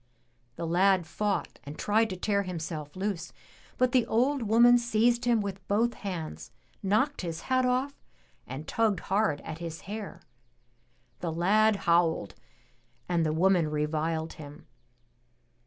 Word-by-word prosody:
The 170 - -4
lad 185 +2 +3
fought 200 +5 -2
and 145 +2 -9
tried 220 +2 +2
to 185 - -4
tear 200 +2 +1
himself 160 -5 -5
loose, 190 -3 -3 0.5
but 255 -1 +2
the 250 -2 +3
old 260 +5 +1
woman 235 +2 +5
seized 235 +1 +2
him 235 -3 +3
with 195 -2 -6
both 230 +4 +2
hands, 165 - -6 0.3
knocked 220 +9 +1
his 165 -3 -5
hat 255 -1 +1
off 255 +3 0 0.5
and 140 +4 -7
tugged 220 -6 +1
hard 195 -6 0
at 160 - -7
his 165 -1 -6
hair. 210 0 -7 1.0
The 170 - -3
lad 205 +6 +3
howled 170 - +2 0.7
and 170 -2 +1
the 155 - +1
woman 170 0 +3
reviled 155 +2 -1
him. 145 -1 -11
190 Hz, 140 wpm, -28 LUFS, 160-220 Hz, 1.0 s, woman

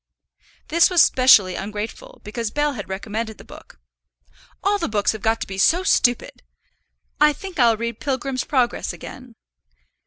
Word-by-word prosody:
This 335 +1 +4
was 360 -2 +5
specially 220 -8 +5
ungrateful, 210 - -7
because 230 +1 -4
Bell 295 +4 -1
had 205 -7 -8
recommended 220 +3 -5
the - - -13
book. - - -15 0.8
"All 405 +1 +1
the 335 - -2
books 205 -2 +1
have 220 - -8
got 225 +1 +1
to - - -2
be 190 0 -7
so 345 - +3
stupid! 245 -9 +1 0.8
I 300 0 +5
think 370 0 -9
I'll 230 -3 +4
read 235 0 -5
Pilgrim's 265 -2 -3
Progress 255 -4 -1
again." 250 -3 -11
240 Hz, 155 wpm, -21 LUFS, 215-295 Hz, 0.8 s, was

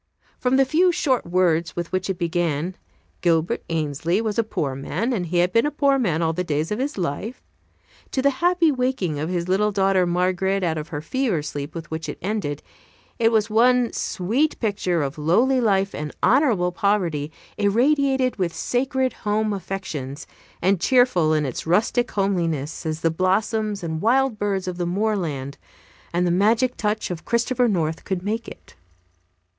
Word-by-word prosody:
From 250 +1 +2
the 270 0 +5
few 340 +7 +3
short 260 - 0
words 170 -2 +1
with 175 -1 -4
which 185 +1 -1
it 190 - -1
began 170 -1 -1 0.5
"Gilbert 165 -1 +1
Ainslee 160 +3 0
was 220 -1 -1
a - - +4
poor 145 -10 -2
man, 220 - -2
and 180 -7 -2
he 175 +2 -1
had 180 +1 +2
been 230 +5 +4
a - - +1
poor 280 -2 +2
man 170 -9 0
all 165 0 +1
the 180 +2 -2
days 155 0 -2
of 210 - -1
his 275 0 -2
life" 185 - -4 0.7
to - - -2
the 280 - +4
happy 350 -2 +4
waking 250 - -1
of 155 +3 -2
his 175 -1 -2
little 205 +3 +2
daughter 195 -2 +2
Margaret 185 +2 0
out 160 -2 0
of 150 - -6
her 145 -3 -5
fever 205 - -1
sleep 145 +1 -6
with 165 -1 -7
which 160 0 -4
it - - -5
ended, 185 -7 -3 0.6
it 225 -1 +4
was 220 -2 +2
one 245 +2 +3
sweet 235 - -1
picture 190 - 0
of 140 +2 -4
lowly 235 - +3
life 195 -3 +2
and 150 0 -4
honorable 230 - +3
poverty 175 -7 0 0.3
irradiated 260 +4 +2
with 180 -4 -1
sacred 260 0 0
home 215 0 -1
affections, 170 -8 -5 0.4
and 190 -1 +2
cheerful 245 -11 +3
in 155 -1 +2
its 130 +3 -5
rustic 225 +7 +2
homeliness 165 -6 -1
as 155 0 -3
the 165 - +2
blossoms 200 +3 0
and 160 -1 -3
wild 250 0 +2
birds 195 -2 -1
of 180 -1 -4
the 175 -1 -2
moorland 175 -9 -2 0.5
and 175 +1 +1
the 175 - +2
magic 225 +7 +2
touch 210 -2 -1
of 170 -2 -5
Christopher 240 +1 +1
North 165 -6 -1
could 185 -2 -3
make 225 +3 -2
it. - - -12
190 Hz, 175 wpm, -23 LUFS, 165-230 Hz, 0.7 s, the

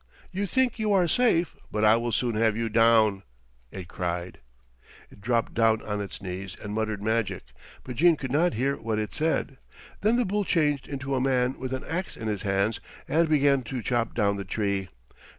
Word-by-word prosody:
"You 200 +2 -2
think 255 +1 +1
you 215 -1 +1
are 185 -3 +4
safe, 180 -6 +2 0.2
but 110 0 +1
I 110 +1 +7
will 120 +1 -1
soon 120 +1 0
have 110 0 +2
you 115 -1 -1
down," 110 -3 +4 0.5
it 95 -3 -8
cried. 85 0 -4 0.7
It - - -16
dropped 115 +1 0
down 110 -1 +3
on 105 -1 -3
its 100 -1 -7
knees 95 0 -6
and 105 - -6
muttered 110 -2 -2
magic, 110 0 -1 0.4
but 125 -2 -7
Jean 170 +3 +5
could 130 -4 -6
not 165 +5 +2
hear 135 +5 0
what 110 -1 -2
it 110 -1 -3
said. 155 -3 -1 0.4
Then 215 +3 +3
the 245 0 +2
bull 205 +2 0
changed 150 -6 +1
into 135 -1 -4
a 130 - +1
man 130 -1 +1
with 130 0 -4
an 130 0 -3
ax 175 +3 -4
in 110 - -5
his 105 -3 -2
hands 100 +2 0 0.3
and 165 +1 +2
began 140 -3 +3
to 125 0 -4
chop 120 -2 -1
down 100 -3 +1
the 100 - -4
tree. 100 -1 -2
115 Hz, 200 wpm, -26 LUFS, 105-150 Hz, 0.7 s, I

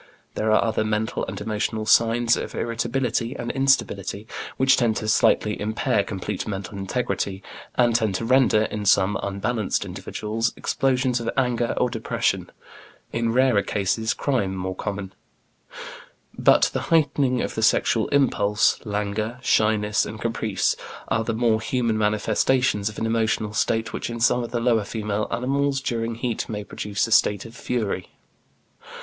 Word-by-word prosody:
There 110 0 0
are 110 - +4
other 110 -1 0
mental 110 0 -1
and 95 +1 -5
emotional 110 +1 -2
signs 115 +2 +4
of - - -5
irritability 120 +1 -1
and 120 0 -3
instability 130 -7 0 0.3
which 130 +1 +5
tend 115 -3 +1
to 110 - -3
slightly 105 -1 +2
impair 105 -1 0
complete 100 +1 -4
mental 100 -1 -5
integrity, 100 -1 -2 0.3
and 120 -2 +3 0.2
to 115 - -2
render, 125 -3 +4
in 105 -1 -4
some 95 +1 +4
unbalanced 105 +2 -1
individuals 110 +2 -3
explosions 130 -2 0
of 115 0 -3
anger 125 -2 +1
or - - +2
depression, 115 -2 -1 0.6
in 115 0 0
rarer 125 -3 +3
cases 110 +4 -1
crime, 110 -9 -1
more 95 0 -3
common; 100 -1 -5 1.2
but - - +4
the - - -1
heightening 140 -6 +2
of - - -3
the 110 - -3
sexual 110 0 +2
impulse, 105 -7 +2
languor, 105 +2 -2
shyness, 105 -2 +2
and 110 0 -6
caprice 110 -3 0 0.3
are 110 - +1
the 115 0 -2
more 110 -1 +2
human 115 -2 0
manifestations 105 +1 +1
of 105 - -11
an - - -2
emotional 110 -2 0
state 110 +1 0
which - - -4
in 115 0 -5
some 125 +1 +3
of 120 - -5
the 120 - -2
lower 115 -2 +2
female 105 0 -3
animals 135 +3 0
during 115 -3 -2
heat 115 -1 -3
may 105 -2 -4
produce 100 0 -2
a 115 - -7
state 105 -1 +3
of 115 0 -11
fury. 110 -8 -3
110 Hz, 150 wpm, -24 LUFS, 105-120 Hz, 1.2 s, which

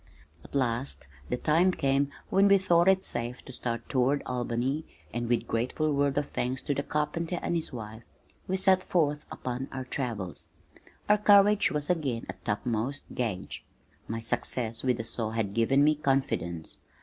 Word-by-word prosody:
At - - -12
last 125 - -1 0.2
the - - 0
time 165 +7 +3
came 140 -1 +1 0.2
when 195 +1 +5
we 200 0 +7
thought 175 -2 +3
it 190 0 +4
safe 120 +1 -2
to - - -8
start 120 -2 -3
toward 135 +2 +1
Albany 125 +4 -1 0.3
and 120 0 -2
with 120 - +1
grateful 130 +7 0
words 140 0 +1
of 145 -1 +1
thanks 125 +1 -2
to 145 - 0
the 140 - -1
carpenter 165 +4 -2
and - - 0
his 165 - -2
wife, 110 -2 -7 0.5
we 190 - 0
set 190 -1 +4
forth 150 -4 0
upon 130 +1 -4
our 130 -1 -5
travels. 115 -9 -4 0.6
Our 210 0 +5
courage 205 0 +6
was 150 +1 0
again 135 -9 -1
at - - -8
topmost 115 +5 -2
gauge. 110 -7 -3 0.4
My 115 +1 -3
success 115 0 -1
with 125 -2 +1
the 115 - -3
saw 115 -1 -2
had 110 -3 -2
given 135 +5 +3
me 155 +1 +5
confidence. 110 - -1
135 Hz, 170 wpm, -29 LUFS, 115-155 Hz, 0.6 s, we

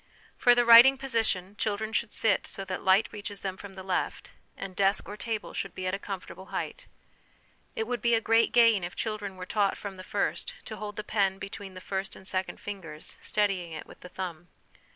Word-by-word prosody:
For 245 -1 +5
the 240 0 +4
writing 235 +4 +10
position 225 -7 -1
children 215 +1 -1
should 230 -1 0
sit 220 -2 +1
so 195 - -4
that 185 -1 -4
light 190 +3 +4
reaches 205 -1 -6
them 190 -1 -3
from 195 0 -10
the 190 - -8
left, 185 -1 -2 0.3
and 195 -1 -6
desk 195 0 +2
or 205 - -6
table 220 0 -4
should 195 - -4
be 185 - -4
at 185 - 0
a 195 - -1
comfortable 190 -1 -7
height. - - -5 0.9
It 220 - -1
would 240 -1 -3
be 235 0 +4
a - - +3
great 225 +1 +3
gain 230 -5 +5
if 175 +1 -5
children 210 -3 -3
were 185 0 -7
taught 200 0 +1
from 200 -2 -7
the 185 - -8
first - - -2
to - - -6
hold 210 -1 -6
the 210 - -4
pen 200 -3 +1
between 195 -1 -8
the 185 - -8
first 195 +1 -3
and 190 - -11
second 185 0 -2
fingers, 165 -7 -6
steadying 195 -5 0
it 155 - -6
with - - -15
the 180 - -11
thumb. 175 -2 -6
200 Hz, 215 wpm, -29 LUFS, 190-220 Hz, 0.9 s, writing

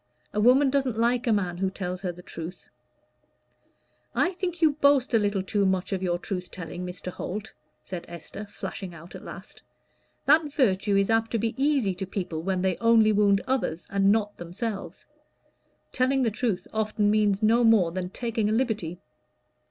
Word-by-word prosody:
A 210 - 0
woman 260 +5 +5
doesn't 265 -5 0
like 240 +2 +1
a - - +4
man 185 -5 0
who 190 +1 0
tells 185 -1 -5
her 185 -3 -2
the 180 +1 -13
truth." 170 +2 -8 1.5
"I 335 +10 +2
think 355 -2 -3
you 320 -2 +5
boast 280 -3 +3
a 225 - +5
little 205 -2 0
too 200 +1 0
much 190 0 0
of 190 - -2
your 175 -2 0
truth 180 0 -5
telling, 180 0 -7
Mr. 180 0 -5
Holt," 210 +5 -6 0.3
said 180 -2 -6
Esther, 175 +4 -8
flashing 190 -3 -7
out 170 +2 -12
at - - -9
last. - - -10 0.6
"That 300 +1 +4
virtue 205 -7 +2
is 195 +2 +2
apt 225 0 +2
to - - +3
be 225 +1 -1
easy 270 -7 +2
to 190 +1 -5
people 175 -5 -4
when 185 +1 -1
they 185 -2 +1
only 230 -2 +5
wound 200 -1 +3
others 240 -11 -1
and 195 0 +4
not 210 -1 0
themselves. 195 +5 -5 0.9
Telling 260 +1 +2
the 230 - +1
truth 205 -5 -2
often 215 -1 +1
means 210 -1 +2
no 230 +3 +4
more 215 -7 +5
than 180 0 -3
taking 225 0 -1
a - - +1
liberty." 220 -8 -1
210 Hz, 180 wpm, -26 LUFS, 185-235 Hz, 1.5 s, woman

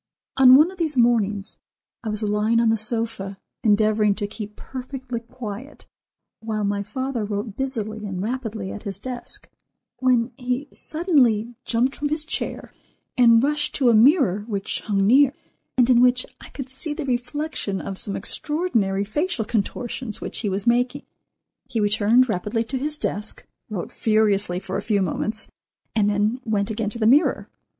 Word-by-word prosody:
On 260 -1 +8
one 310 +6 +6
of 380 - -14
these 310 -5 -1
mornings, 215 -4 +2 0.4
I 220 - -3
was 215 +1 -1
lying 210 +2 +2
on 230 -1 +3
the 225 - +4
sofa 215 -3 -2 0.3
endeavouring 215 -1 +3
to 210 - -3
keep 210 0 -7
perfectly 260 -2 -6
quiet, 235 +2 -8 0.5
while 220 -1 -3
my 200 0 0
father 245 +3 -3
wrote 205 0 -4
busily 220 -5 -3
and 190 -2 -4
rapidly 220 -2 -3
at 210 - -7
his 200 -3 -3
desk, 250 +3 -7 0.5
when 250 -2 +2
he 250 +2 -2
suddenly 255 - +2
jumped 250 +3 +1
from 290 0 -2
his 305 +1 0
chair - - -3 0.4
and 230 -1 +6
rushed 295 +1 0
to 255 -4 +4
a - - +3
mirror 225 - +4
which 200 -3 -2
hung 195 -2 +1
near, 270 +5 +5 0.4
and 245 -2 +5
in 245 -2 +5
which 250 0 +4 0.2
I - - -11
could 270 -2 -7
see 295 +3 -4
the 310 - -4
reflection 250 -4 -2
of 195 -1 -5
some 200 - -4
extraordinary 230 - -1
facial 270 - -1
contortions 225 +1 -3
which - - -4
he 210 - -1
was 195 +2 -3
making. 245 +4 +1 0.6
He 240 -4 -1
returned 215 +4 +4
rapidly 215 +2 -1
to 260 +3 -4
his 300 +2 -2
desk, 210 -6 -4 0.2
wrote 200 -5 -4
furiously 210 -4 +1
for 190 0 -4
a - - -2
few 205 -3 +1
moments, 215 +5 -3 0.4
and 205 -2 +3
then 210 +5 0
went 210 -2 0
again 215 -1 -2
to 225 - -6
the 220 - 0
mirror. 275 +8 +3
230 Hz, 165 wpm, -23 LUFS, 210-260 Hz, 0.6 s, On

